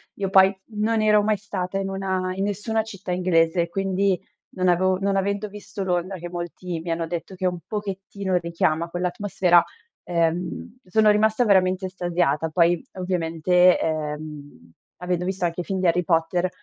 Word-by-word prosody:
io 195 -2 -2
poi 190 0 +6 0.2
non 215 +1 0
ero 210 -1 +5
mai 210 0 +1
stata 195 -2 -4
in 195 0 -2
una 190 -1 -2
in 195 +1 -2
nessuna 220 +2 -1
città 195 -4 -7
inglese, 170 -1 +2
quindi 195 0 0 0.4
non 185 -1 +2
avevo 185 +1 +3
non 200 0 0
avendo 200 +2 -1
visto 200 -1 -7
Londra, 185 +1 -1
che 175 +1 -7
molti 175 0 -5
mi 170 +1 -7
hanno 165 0 -1
detto 170 +3 -5
che 185 0 -4
un 180 -1 0
pochettino 195 -2 -3
richiama 170 -1 0
quell'atmosfera, 180 0 +2 0.4
ehm, 175 +7 -2
sono 215 +3 +4
rimasta 220 +3 +3
veramente 185 -1 +3
estasiata. 175 -4 0
Poi 170 +1 +2
ovviamente, 180 0 +2
ehm, 150 - -5 0.3
avendo 180 0 -2
visto 185 -1 -1
anche 170 +1 -2
i - - -5
film 190 +1 -3
di 185 - -1
Harry 175 +2 +2
Potter, 175 +2 +1
185 Hz, 160 wpm, -24 LUFS, 170-195 Hz, 0.4 s, poi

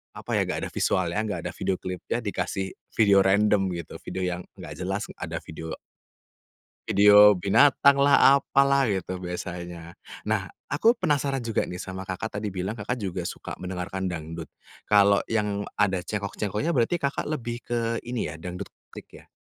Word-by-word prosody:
apa - - -11
ya, - - +3
nggak - - -2
ada - - -9
visualnya, 95 +2 0
nggak 105 - -3
ada - - -4
video 95 - -1
klipnya, 90 +5 -4
dikasih 95 -2 -3 0.2
video 100 -3 +5
random 100 +1 +4
gitu 85 -2 -7
video 95 - -5
yang 90 -1 -1 0.2
nggak - - -9
jelas, - - -2 0.2
ada - - -5
video 80 0 -7 1.1
video 105 0 +7
binatanglah, 140 +7 +5
apalah, 140 -1 +3
gitu 95 -3 -2
biasanya. 90 -1 -7 0.3
Nah - - 0 0.2
aku 225 - +4
penasaran 145 - 0
juga 115 -2 -1
nih 90 0 -6
sama 95 0 -7
Kakak 105 +3 -4
tadi 105 - -3
bilang 95 +5 -3
Kakak 105 +4 -2
juga 90 -2 -3
suka - - -7
mendengarkan 95 +1 -4
dangdut, 80 -1 -5 0.4
kalau 100 -1 +5
yang 105 -2 -1
ada 95 -3 +2
cengkok-cengkoknya 105 - -2
berarti 130 +2 +2
Kakak 140 0 -1
lebih 120 -6 -3
ke 115 -1 -1
ini 120 -10 -2
ya, 80 - -9
dangdut 90 +3 -7 0.2
klik - - -11
ya? - - -18
100 Hz, 160 wpm, -26 LUFS, 90-115 Hz, 1.1 s, video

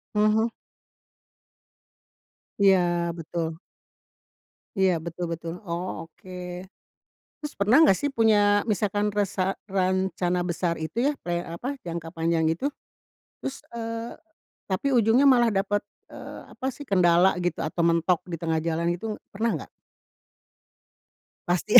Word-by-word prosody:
Mhm. 215 +2 +3 2.1
Iya, 195 -1 +7 0.4
betul. 165 0 -3 1.2
Iya 190 -1 +5
betul 170 +1 -4
betul, 165 0 -4
oh 170 +2 -2 0.2
oke. 170 +3 -15 1.1
Terus 300 - -4
pernah 210 +4 +4
gak 195 -11 +5
sih 285 - 0
punya, 205 -2 +4
misalkan 210 0 0
resa 195 -2 -1
rencana 185 -2 0
besar 170 -1 -1
itu 160 +6 -6
ya, 285 - +3
pley 175 0 -2
apa, 215 +12 -5
jangka 170 -1 -6
panjang 165 0 +1
itu? 175 - 0 0.7
Terus 270 - -4 0.2
eee, 230 0 -4 0.5
tapi 195 +9 -1
ujungnya 240 +2 +4
malah 240 -4 +4
dapet, 205 +1 +1 0.3
eee, - - -9
apa 260 - -6
sih 290 - -9
kendala 180 0 +4
gitu 175 -2 -1
atau 160 +2 -1
mentok 170 +1 +3
di 175 - -5
tengah 165 -1 -1
jalan 165 +1 0
itu 220 +1 -4 0.2
pernah 225 +3 0
nggak? - - -13 1.8
Pasti 180 +6 +5
ya. - - +14
190 Hz, 125 wpm, -26 LUFS, 170-215 Hz, 2.1 s, ya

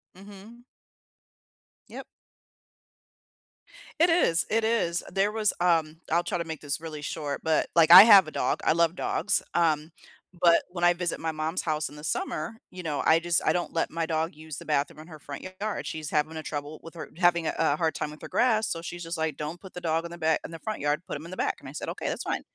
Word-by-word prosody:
Mhm. 205 +5 -14 1.3
Yep. - - -8 2.0
It 345 - +5
is, 250 - +2
it 225 +1 +1
is, 220 -7 0
there 195 +2 +1
was, 215 -2 +1
um, 165 -3 +1
I'll 170 +1 +3
try 175 - -2
to 170 - -1
make 160 -2 -6
this 145 +1 -3
really 155 -2 -7
short 145 -1 -4
but, 160 -1 +1
like, 165 -1 +5
I 180 +2 +14
have 205 -6 +8
a 155 - -7
dog, - - -1
I - - +3
love 170 +1 +2
dogs, 205 - 0
um, 160 -2 +1 0.5
but 170 -1 +5
when 175 -1 -5
I 175 0 +6
visit 175 -1 -3
my 160 0 -2
mom's 155 +3 -2
house 155 -1 -1
in 145 - -12
the 150 - -11
summer, 155 +5 -3 0.2
you 180 - -8
know, 150 -4 -2
I 160 +1 +5
just 170 0 0
I - - +3
don't 175 -1 -2
let 165 - -1
my 165 0 -2
dog 160 0 -1
use 155 -1 -9
the - - -9
bathroom 150 0 -1
in 155 - -14
her 155 -3 -11
front 140 0 -9 0.2
yard 215 -1 -3
she's 155 -1 -5
having 155 +1 0
a - - -4
trouble 150 0 -6
with 165 +1 -12
her 160 - -8
having 175 -2 +3
a - - -1
a 160 -3 +3
hard 160 +1 0
time 150 - -3
with 150 - -13
her - - -6
grass, 220 -3 +2
so 165 - -3
she's 175 0 -7
just 165 0 -5
like, 160 -3 -2
"Don't 155 +3 -6
put 190 - -12
the 180 - -6
dog 165 0 0
in - - -6
the 170 - -8
back 160 -1 +1
in - - -7
the 165 - -7
front 215 +6 -5
yard, 145 +3 -1
put - - -4
him 155 - -11
in 170 - -10
the 185 - -7
back," - - -1
and - - -10
I - - -9
said, - - -5
"Okay, - - -5
that's - - -3
fine." - - -2
165 Hz, 245 wpm, -27 LUFS, 155-175 Hz, 2.0 s, I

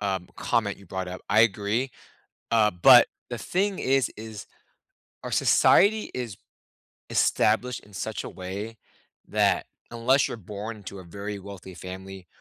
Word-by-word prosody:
um, 95 -3 -2
comment 110 -5 0
you 100 - -16
brought 95 +1 -4
up. 90 - -7
I - - +5
agree, 115 +4 +1 0.6
uh, 110 -2 +4
but 90 0 +8 0.2
the - - -5
thing 195 +1 -1
is 135 0 +2
is 110 -1 -8 0.8
our - - -5
society 215 +2 +4
is 120 -6 -4 0.7
established 120 +3 +2
in 105 - -19
such 110 +4 -4
a - - -6
way 100 +5 -6 0.5
that, - - +2 0.3
unless 125 +3 +3
you're - - -6
born 105 +3 -7
into 100 -1 -9
a - - -10
very 100 +4 -6
wealthy 95 -1 -10
family, 95 0 -9
105 Hz, 145 wpm, -26 LUFS, 95-115 Hz, 0.8 s, but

